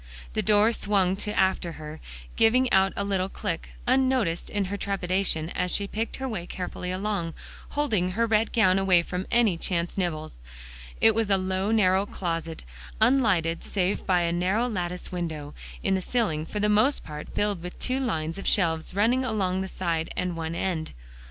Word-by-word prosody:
The - - 0
door 210 +1 +4
swung 195 -4 +1
to 210 +1 -1
after 190 -3 +1
her, 155 0 -8 0.4
giving 250 +3 +4
out 190 0 +5
a 200 - -1
little 195 -1 0
click, 165 -3 -4 0.2
unnoticed 255 -9 +1
in 205 -1 -1
her 195 +2 -3
trepidation 185 -4 -1
as 180 - -1
she 200 - 0
picked 220 +3 -3
her 265 - -4
way 195 -8 -4
carefully 180 0 -5
along, 185 -3 -2 0.3
holding 215 -12 0
her 230 +4 +2
red 220 -1 +2
gown 195 -4 +4
away 185 -3 +4
from 180 +2 -4
any 220 -8 +3
chance 175 +1 -1
nibbles. 155 - -3 0.6
It 225 - +6
was 220 -1 0
a 195 - +4
low 190 +1 -1
narrow 200 -3 +3
closet, 165 -4 -3 0.4
unlighted 185 -11 +3
save 190 -1 -1
by 180 -2 +3
a 170 -1 +1
narrow 185 +8 +1
latticed 180 -5 -4
window, 160 -5 -4 0.3
in 195 - +2
the 190 - +1
ceiling, 180 -9 0
for 210 - -4
the 210 - +2
most 215 +7 +3
part 150 0 -8
filled 205 -4 0
with 180 +1 -7
two 255 +1 -1
lines 165 -9 -2
of - - -5
shelves 165 -2 +1
running 235 +6 +3
along 195 -6 0
the 190 - -3
side 165 -4 -2
and 180 -1 -1
one 165 0 -4
end. 170 -4 -2
190 Hz, 180 wpm, -26 LUFS, 175-210 Hz, 0.6 s, It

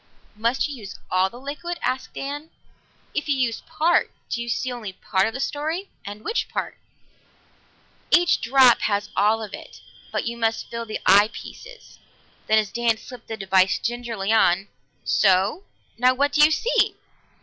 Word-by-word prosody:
"Must 230 +4 0
you 285 -2 -7
use 200 -4 -9
all 185 +1 +3
the 240 - -12
liquid?" 300 +6 -5
asked 260 0 -2
Dan. 290 +3 -5 0.6
"If 300 - -2
you 285 - +3
use 240 -3 0
part, 335 +3 +2 0.2
do 235 - -1
you 235 - -5
see 255 +2 -1
only 225 -6 -6
part 190 +2 0
of 225 - -4
the - - -4
story? 315 +8 -3
And 205 +1 -8
which 460 - -1
part?" - - -4 1.4
"Every 350 0 +6 0.2
drop 255 0 +6
has 205 0 -1
all 220 +2 +2
of 205 - -8
it, - - -10 0.3
but - - -2
you 235 0 -3
must 225 -1 -1
fill 230 0 -5
the 215 - -4
eye 205 +3 +6
pieces." - - -12 0.5
Then 220 - +4
as 215 -2 +1
Dan 235 -1 +1
slipped 245 +1 -12
the 225 - -5
device 190 -2 +3
gingerly 230 -4 -2
on, 195 -2 +3 0.3
"So! 195 - +2 0.3
Now 255 +1 +4
what 285 +2 +1
do 300 0 +5
you 305 - +7
see?" 465 +10 +1
235 Hz, 170 wpm, -23 LUFS, 210-280 Hz, 1.4 s, you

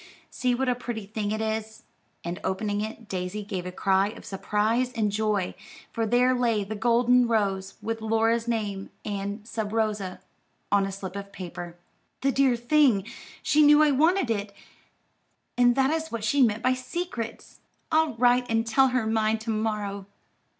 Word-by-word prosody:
See 250 -1 0
what 265 +2 -1
a 250 - +3
pretty 240 -3 -5
thing 210 0 -3
it 215 +1 -2
is;" 220 0 -3 0.4
and 175 +2 -4
opening 205 +1 -1
it, 220 +1 -6
Daisy 185 +2 -4
gave 190 -3 -4
a - - -5
cry 190 +1 +2
of 220 +3 -9
surprise 215 +5 0
and 215 -4 0
joy, 210 -3 0 0.4
for 225 -1 -1
there 250 +3 +3
lay 235 -4 +1
the 200 +2 -5
golden 240 +2 +3
rose, 195 -4 0
with 225 +1 -3
Laura's 225 +1 +1
name 210 -4 -2 0.2
and 205 +1 -4
"Sub 220 -3 -3
rosa" 210 -4 -1 0.5
on 200 -1 +3
a - - -5
slip 195 -1 -7
of 200 0 -7
paper. 175 -2 -7 0.5
"The 275 - +2
dear 265 -1 +3
thing! 240 -4 +3 0.4
she 305 - +3
knew 295 +1 +7
I 300 - +4
wanted 315 0 +3
it, 200 -2 -2 1.0
and 245 0 +4
that 270 +1 +3
is 320 0 -2
what 230 -2 -4
she 275 +6 +2
meant 225 -2 +2
by 255 - +3
'secrets.' 255 -3 -5 0.3
I'll 315 -5 +2
write 245 +1 +3
and 225 0 +1
tell 265 +4 +4
her 255 -3 0
mine 220 0 +1
to 220 +1 -4
morrow." 210 -2 -2
220 Hz, 170 wpm, -26 LUFS, 205-245 Hz, 1.0 s, knew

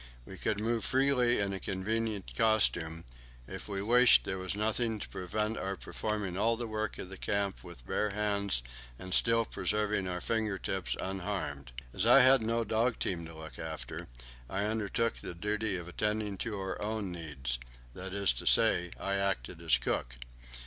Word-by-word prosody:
We 95 - -9
could 105 -1 0
move 115 +1 0
freely 130 -2 +3
in 100 -1 0
a 95 - -3
convenient 105 +2 -2
costume; 90 -7 +2 0.4
if - - -7
we 100 -1 -2
wished, 120 +3 +7
there 95 - -3
was 95 +1 -2
nothing 110 +2 0
to - - -6
prevent 105 +5 -2
our 95 0 -2
performing 105 -2 -3
all 115 +4 +2
the 120 - -3
work 110 -1 -3
of 90 - -7
the 95 - -8
camp 100 -1 -1
with 75 -9 -11
bare 105 - 0
hands 100 -8 +1 0.3
and 95 +5 -5
still 115 +1 +4
preserving 105 0 0
our 90 0 -2
finger 110 -1 -1
tips 95 -1 -1
unharmed. 95 -9 -3 0.2
As 100 +4 +1
I 130 +3 +9
had 130 0 +7
no 115 +1 +1
dog 115 +3 +1
team 85 -3 -2
to 80 - -11
look 80 -1 -9
after, 80 -6 -5 0.4
I 100 +2 -1
undertook 110 +1 0
the - - -6
duty 105 +3 0
of 85 -2 -5
attending 105 +2 -1
to 110 -3 -3
our 95 -1 -4
own 105 -2 -2
needs; 70 -8 -3 0.3
that 95 0 -6
is 100 -8 +3
to - - -5
say, 90 0 +4
I 100 0 -1
acted 100 -11 -2
as 60 - +4
cook. - - -2
100 Hz, 175 wpm, -32 LUFS, 90-110 Hz, 0.4 s, I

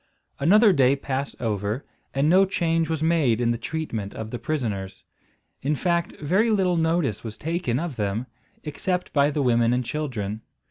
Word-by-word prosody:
Another 205 +8 +6
day 135 -3 +4
passed 140 0 -3
over, 105 +2 -2 0.3
and 135 +2 +1
no 185 +4 +6
change 165 -4 0
was 160 -1 -1
made 155 -9 +2
in 120 -1 +2
the 120 - -1
treatment 115 -8 -4
of 110 0 -6
the 120 - -4
prisoners. 100 -10 -3 0.6
In 150 +3 0
fact 170 +2 0
very 190 +10 +2
little 190 -4 +2
notice 160 - 0
was 110 -1 -7
taken 160 -6 -1
of 160 -5 -4
them, 105 +3 -1 0.4
except 180 +4 -3
by 145 -1 +4
the 145 -1 -1
women 120 -1 +3
and 125 0 0
children. 115 -8 -3
140 Hz, 170 wpm, -24 LUFS, 115-165 Hz, 0.6 s, Another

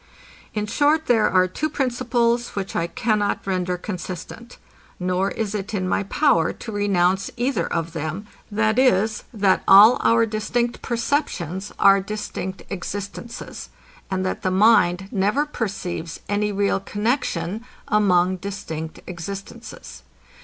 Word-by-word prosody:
In 210 -1 -1
short 295 +8 +2
there 225 -3 +3
are 185 0 +4
two 305 +12 -2
principles, 240 -3 0
which 195 -1 -4
I 170 - 0
cannot 215 -1 0
render 180 -2 -1
consistent; 185 +5 -7 0.4
nor 185 +2 0
is 215 -2 -3
it 210 0 -3
in 185 -2 -1
my 185 - +1
power 200 - +2
to 225 - -8
renounce 195 -2 +1
either 255 +3 -1
of 165 -1 -2
them, 160 +6 -4 0.2
viz, 220 0 +2
that 200 -5 +2
all 210 +5 +9
our 230 0 +4
distinct 230 +2 -2
perceptions 230 - -2
are 195 0 +6
distinct 195 -2 -5
existences, 200 +4 -6 0.4
and 185 -1 -1
that 185 - -2
the 185 - 0
mind 190 -2 +4
never 210 +9 +1
perceives 180 - -4
any 205 0 0
real 200 0 +1
connexion 210 -2 -2 0.2
among 185 -3 +3
distinct 165 -5 -6
existences. 195 +6 -8
205 Hz, 125 wpm, -22 LUFS, 185-230 Hz, 0.4 s, all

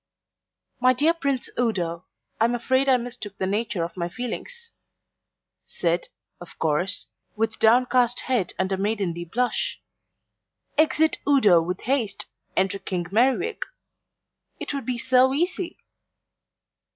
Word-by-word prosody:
"My 255 +1 +5
dear 300 +6 +3
Prince 280 -6 -1
Udo, 180 -8 -1 0.3
I'm 235 +2 +3
afraid 260 +3 +1
I 260 - +6
mistook 230 -5 -7
the 190 - -1
nature 205 -2 -1
of 170 - -5
my 175 -2 -3
feelings" 460 - -6 1.0
said, 170 0 -1 0.3
of 175 - -12
course, 160 +5 0 0.3
with 220 0 -1
downcast 245 +1 +4
head 245 -8 0
and 190 +1 -1
a 190 - +1
maidenly 195 -4 -1
blush. 245 +8 -1 1.0
Exit 315 +1 +3
Udo 215 -12 +5
with 180 +2 -4
haste, 245 -5 -1 0.3
enter 190 +1 +1
King 180 -3 -3
Merriwig. 260 - +2 1.0
It - - -4
would 275 -2 -4
be 250 -1 -1
so 260 +2 +3
easy. 355 +3 -1
235 Hz, 125 wpm, -24 LUFS, 190-260 Hz, 1.0 s, I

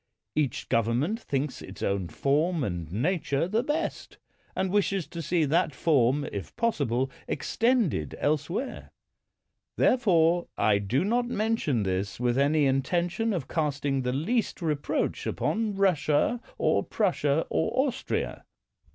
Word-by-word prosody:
Each 145 -6 -1
government 120 - +1
thinks 140 - -3
its - - -9
own 100 -2 0
form 150 - +1
and 85 -7 -4
nature 145 - 0
the 215 +5 +1
best, 295 +5 -3 0.4
and 190 -1 0
wishes 195 -3 +1
to 170 - -5
see 165 +1 +1
that 155 0 +1
form, 145 -1 +2
if 100 - -6
possible, 135 - 0 0.2
extended 225 - 0
elsewhere. 155 - -2 0.9
Therefore 175 -8 +3
I 100 -1 +3
do 120 - 0
not 240 +3 +1
mention 215 - 0
this 95 +2 -2
with 120 +1 +1
any 145 +1 +3
intention 175 +11 0
of 170 -10 -2
casting 145 -3 -1
the 125 0 -1
least 205 - -1
reproach 150 -5 -1
upon 215 -2 -1
Russia, 185 +3 +2 0.2
or - - +2
Prussia, 160 -7 +1
or 260 - +1
Austria. 255 -1 -3
155 Hz, 125 wpm, -27 LUFS, 130-200 Hz, 0.9 s, Therefore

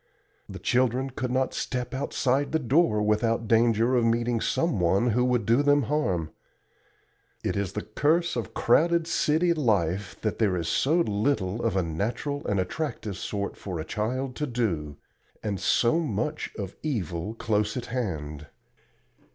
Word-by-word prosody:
The - - -7
children 130 +1 +1
could 125 0 -3
not 130 +1 0
step 125 -1 -3
outside 140 +1 0
the - - +4
door 125 -5 +2
without 115 +2 +1
danger 115 +2 +3
of 120 - +3
meeting 115 0 +1
some 165 - 0
one 95 +7 +2
who 125 +3 +2
would 125 -2 +1
do 115 +4 +4
them 145 0 +4
harm. 95 - -1 1.1
It - - -1
is 100 -3 -2
the - - -3
curse 165 +4 +1
of 120 - -4
crowded 170 +6 +3
city 170 +1 +2
life 100 - 0
that 110 - -2
there 100 -5 +2
is 85 -2 -2
so 160 - +2
little 105 - 0
of 115 -5 0
a 95 - +2
natural 115 - -3
and 100 -2 +1
attractive 105 - -3
sort 100 -1 -3
for 90 -4 -5
a 80 - -4
child 125 +8 -2
to 150 - -1
do, 90 - -2 0.5
and 100 -3 -2
so 120 - +3
much 150 0 -2
of 100 -3 -5
evil 105 - -3
close 105 0 0
at 125 - -4
hand. 75 - -4
115 Hz, 160 wpm, -27 LUFS, 100-135 Hz, 1.1 s, the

